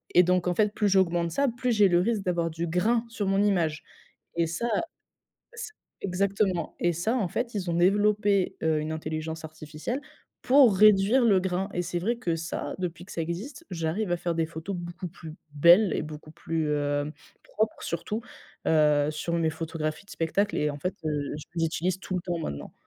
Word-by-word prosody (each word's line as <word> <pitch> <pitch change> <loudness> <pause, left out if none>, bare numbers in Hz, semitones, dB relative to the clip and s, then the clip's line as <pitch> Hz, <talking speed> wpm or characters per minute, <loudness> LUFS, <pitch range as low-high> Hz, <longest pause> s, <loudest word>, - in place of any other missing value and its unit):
et 180 - +8
donc 180 0 +2
en 180 - +1
fait 210 +1 +2
plus 210 -2 +1
j'augmente 175 -3 +2
ça, 280 +11 +1
plus 245 +1 -1
j'ai 210 -3 +5
le 175 -1 +3
risque 210 +1 0
d'avoir 170 -3 0
du 165 +2 -3
grain 220 +8 +1
sur 210 -3 -3
mon 195 +1 +2
image 175 -7 +1 0.6
et 170 - +4
ça, 170 +9 -2 0.9
s 455 0 -6 0.3
exactement, 195 -2 0
et 175 - +2
ça 180 +9 0
en 220 -7 +1
fait 235 +6 -3
ils 185 -4 -2
ont 170 - 0
développé, 200 +2 +3
heu, 160 -1 +2
une 155 +1 -3
intelligence 160 +1 -4
artificielle 155 - -5 0.4
pour 255 -6 +6
réduire 215 +5 +5
le 200 -5 +5
grain 190 +1 -1
et 175 - 0
c'est 175 0 -2
vrai 230 +7 0
que 170 -8 -1
ça, 165 +1 -4
depuis 175 -1 -4
que 185 - -15
ça 165 - -2
existe, 210 - -6
j'arrive 175 +3 -1
à - - +2
faire 170 0 -2
des 165 -1 0
photos 165 +4 -5
beaucoup 175 +1 -6
plus 160 -1 -10 0.2
belles 175 +7 +6
et - - -1
beaucoup 155 0 -9
plus, 160 -2 -2
hem, 145 0 -1 0.3
propres 215 0 -2
surtout, 210 +6 -3 0.5
heu, 150 -2 +4
sur 155 +2 -4
mes 165 -1 +1
photographies 155 +1 -4
de - - -16
spectacles 170 +6 0
et 150 - +1
en 145 - -7
fait, 180 +6 -2
heu, 145 -2 -2
j 150 - -8
je 170 - -2
les 165 - +3
utilise 175 +3 -1
tout 190 - -5
le - - -1
temps, 175 -1 -2
maintenant. 70 - -5
175 Hz, 200 wpm, -27 LUFS, 160-200 Hz, 0.9 s, et